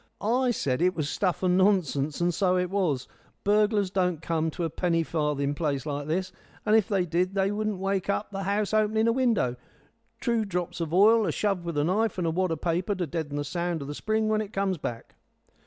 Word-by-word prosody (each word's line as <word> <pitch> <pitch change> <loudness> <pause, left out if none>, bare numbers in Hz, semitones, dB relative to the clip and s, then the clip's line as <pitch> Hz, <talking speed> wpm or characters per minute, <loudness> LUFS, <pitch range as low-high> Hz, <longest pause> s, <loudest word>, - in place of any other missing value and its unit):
"I 250 +4 +1
said 140 - 0
it 180 +1 +2
was 155 -3 -1
stuff 185 +3 -1
and 180 0 +3
nonsense, 155 -7 +2
and 175 0 +1
so 185 +1 +2
it 180 0 -1
was. 165 -10 0 0.4
Burglars 205 -1 +2
don't 180 -4 0
come 160 0 -1
to 170 +2 -4
a 165 - 0
penny 165 -1 +1
farthing 150 -3 -1
place 145 -4 -2
like 145 -1 -3
this; 180 +4 -1 0.3
and 215 - +4
if 220 -3 +4
they 195 -5 +1
did, 180 +3 0
they 195 0 +2
wouldn't 210 -1 -2
wake 195 0 -1
up 205 +1 -1
the 195 -1 -4
house 200 +2 -1
opening 215 +1 +2
a - - +4
window. 230 - +1 0.6
Two 235 -3 +1
drops 180 -3 -3
of 160 -2 -3
ile, 215 +4 +5
a - - +1
shove 195 -4 -1
with 170 -2 -3
the 145 - +2
knife, 200 +6 +1
and 180 - -1
a 165 - +1
wad 185 +1 0
o' - - +1
paper 175 +5 -1
to 180 -2 -2
deaden 160 -2 -4
the 145 - -1
sound 170 +1 -2
of - - -8
the 145 - -4
spring 215 +6 0
when 215 0 +1
it 215 -1 -7
comes 195 -3 0
back." 115 -4 -6
180 Hz, 225 wpm, -27 LUFS, 165-205 Hz, 0.6 s, ile